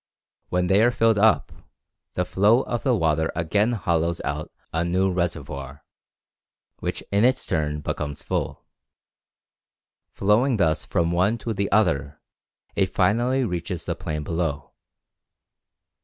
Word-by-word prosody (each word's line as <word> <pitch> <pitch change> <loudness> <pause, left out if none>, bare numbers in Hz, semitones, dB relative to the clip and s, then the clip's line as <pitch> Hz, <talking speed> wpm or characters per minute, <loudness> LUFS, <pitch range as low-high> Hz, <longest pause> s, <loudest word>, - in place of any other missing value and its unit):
When 90 0 +1
they 95 +3 +4
are 120 - +5
filled 115 -3 +2
up, 110 +2 +3 0.6
the 90 - -1
flow 105 +7 +4
of 120 - -3
the 130 -3 +2
water 80 -4 +1
again 100 +8 +1
hollows 85 -5 0
out - - -3 0.2
a 80 +1 +1
new 95 +2 +1
reservoir, 75 -6 -4 0.9
which - - -4
in 100 +2 +3
its 130 +2 +2
turn 75 -1 -1
becomes 75 0 -4
full. - - -3 1.4
Flowing 110 +5 +2
thus 80 -4 +1
from 85 -3 0
one 95 +6 +2
to 115 0 -4
the 100 -1 -2
other, 75 -8 +1 0.6
it - - 0
finally 125 +5 +2
reaches 90 -2 -4
the - - -1
plain 75 -1 -4
below. 80 -3 -3
90 Hz, 130 wpm, -24 LUFS, 80-110 Hz, 1.4 s, are